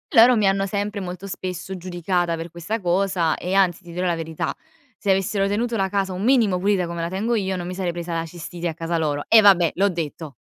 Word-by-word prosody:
Loro 235 +2 +8
mi 210 -2 +3
hanno 195 0 +2
sempre 205 +1 -3
molto 185 +1 -6
spesso 185 0 -5
giudicata 175 -1 -1
per 165 +1 -6
questa 170 +7 -4
cosa 180 -2 +1
e 180 +2 -4
anzi 190 -2 +2
ti 175 - -11
dirò 180 +2 -2
la 175 -2 +1
verità, 160 -1 -4 0.4
se 200 - 0
avessero 195 +1 +1
tenuto 230 +4 -1
la 195 -3 0
casa 195 -1 -1
un 185 +2 -4
minimo 230 -6 +3
pulita 190 -1 +1
come 170 0 -4
la 165 - -2
tengo 215 +6 -1
io, 190 -3 -1
non 175 -1 -5
mi 185 - -5
sarei 185 -2 -1
presa 170 0 -5
la 165 0 -1
cistite 170 +1 -5
a - - -4
casa 165 +1 -2
loro 145 -2 -1
e 225 - +7
vabbè, 185 -5 +5
l'ho 200 +3 +3
detto. 160 -3 -5
185 Hz, 235 wpm, -22 LUFS, 170-195 Hz, 0.4 s, Loro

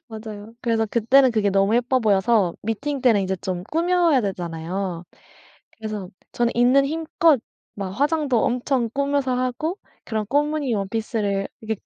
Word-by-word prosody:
맞아요. 220 -1 -9
그래서 225 -2 0
그때는 250 +5 +4
그게 215 -3 +1
너무 195 +2 +2
예뻐 245 +2 +2
보여서 205 -3 +2
미팅 270 +6 -3
때는 230 -5 +4
이제 190 0 -2
좀 180 0 -4
꾸며야 335 -3 +3
되잖아요. 175 -1 -4 0.7
그래서 215 -4 -5 0.2
저는 240 0 0
있는 250 +3 +4
힘껏 320 -1 +2 0.4
막 195 -2 -4
화장도 285 - +1
엄청 245 -1 0
꾸며서 280 -2 0
하고, 255 - -2 0.3
그런 220 -2 -2
꽃무늬 290 0 0
원피스를 200 -1 -2
이렇게 220 -2 -4
230 Hz, 325 characters per minute, -23 LUFS, 200-275 Hz, 0.7 s, 그때는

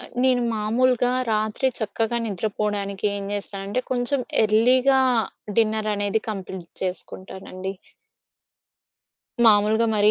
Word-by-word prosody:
ఆహ్, - - -10
నేను 255 -2 +3
మామూలుగా 245 +3 +2 0.2
రాత్రి 215 +4 +1
చక్కగా 225 +2 -1
నిద్రపోవడానికేం 200 0 -2
జేస్తానంటే, 200 +3 -3
కొంచెం 255 +2 0 0.2
ఎర్లీగా 250 +5 +4 0.6
డిన్నర్ 220 -1 +2
అనేది 205 +1 -1
కంప్లీట్ 190 -3 -7
చేసుకుంటానండి. 190 0 -5 1.7
మామూలుగా 215 +1 +5
మరీ 210 0 +5
215 Hz, 90 wpm, -23 LUFS, 200-235 Hz, 1.7 s, మామూలుగా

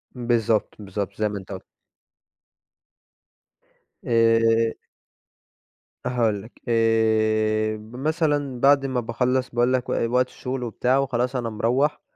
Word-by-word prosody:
بالضبط، 115 -3 0
بالضبط 100 0 -5
زي 105 0 0
ما 105 - -5
أنت 95 -1 -10
ق 95 - -7 2.4
آآ 115 -1 +3 1.3
هاقول 115 -5 0
لك، 110 +4 -16
آآ 110 -1 +2
ب 110 +3 -13
مثلًا 145 -2 -1
بعد 140 +1 +4
ما 130 -2 -1
باخلص 125 +2 -1
باقول 120 +1 +1
لك 125 -1 -1
و - - 0 0.2
وقت 125 +1 +2
الشغل 130 0 -5
وبتاع 125 +3 0
وخلاص 125 -1 -1
أنا 120 -2 -2
مروَّح، 125 +7 0
120 Hz, 120 wpm, -23 LUFS, 110-125 Hz, 2.4 s, بعد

